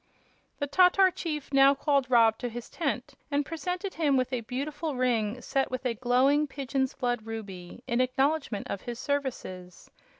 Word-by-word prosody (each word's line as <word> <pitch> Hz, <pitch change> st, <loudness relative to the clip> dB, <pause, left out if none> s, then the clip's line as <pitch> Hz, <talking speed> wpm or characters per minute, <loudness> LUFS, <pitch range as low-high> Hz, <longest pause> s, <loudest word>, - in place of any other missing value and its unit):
The 285 Hz, -, -1 dB
Tatar 365 Hz, +5 st, +5 dB
chief 300 Hz, -5 st, -5 dB
now 275 Hz, +1 st, +6 dB
called 280 Hz, -2 st, +1 dB
Rob 225 Hz, -3 st, +5 dB
to 245 Hz, -, -3 dB
his 240 Hz, +1 st, -8 dB
tent 275 Hz, -7 st, -2 dB, 0.2 s
and 285 Hz, 0 st, 0 dB
presented 360 Hz, +5 st, -4 dB
him 290 Hz, -5 st, +2 dB
with 255 Hz, 0 st, -1 dB
a 250 Hz, -, 0 dB
beautiful 285 Hz, +6 st, -4 dB
ring 240 Hz, -3 st, 0 dB
set 270 Hz, -1 st, 0 dB
with 255 Hz, +1 st, -5 dB
a 245 Hz, -, +1 dB
glowing 255 Hz, +5 st, +3 dB
pigeon's 270 Hz, -1 st, -2 dB
blood 245 Hz, -3 st, -2 dB
ruby, 200 Hz, -2 st, -8 dB
in 245 Hz, 0 st, +1 dB
acknowledgment 265 Hz, -3 st, 0 dB
of 200 Hz, -, -4 dB
his 240 Hz, -1 st, -6 dB
services. 240 Hz, -, -4 dB
260 Hz, 165 wpm, -28 LUFS, 240-285 Hz, 0.2 s, now